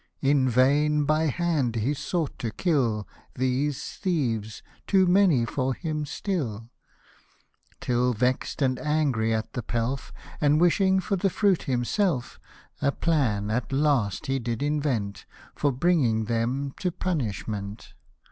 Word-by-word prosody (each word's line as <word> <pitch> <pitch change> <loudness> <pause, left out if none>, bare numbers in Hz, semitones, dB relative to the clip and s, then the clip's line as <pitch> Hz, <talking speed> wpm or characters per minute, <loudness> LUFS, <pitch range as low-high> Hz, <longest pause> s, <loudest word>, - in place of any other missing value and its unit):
In 135 -1 +3
vain 145 +5 +3
by 155 +2 +2
hand 150 -6 0
he 115 +6 0
sought 150 +1 -3
to 115 - -2
kill 115 - 0 0.3
These 130 +2 -1
thieves, 120 - -1 0.2
too 190 -2 +4
many 180 -9 +4
for 130 +2 -1
him 155 -3 -3
still; 120 - -3 1.1
Till 125 0 +1
vex'd 125 +5 0
and 130 -1 +1
angry 145 -8 +1
at 110 0 -2
the 125 - -3
pelf, 120 +4 -3 0.3
And 150 0 +4
wishing 190 +3 +3
for 195 +1 -1
the 195 +2 +1
fruit 195 -1 +2
himself, 130 - 0 0.4
A 140 -1 +2
plan, 120 -12 0
at 115 +2 -2
last, 135 -8 +1
he 135 0 0
did 120 +1 -3
invent, 140 -9 -1 0.3
For 145 - +1
bringing 130 -7 +2
them 120 +5 -1
to 180 - 0
punishment. 110 - -4
135 Hz, 130 wpm, -26 LUFS, 115-155 Hz, 1.1 s, too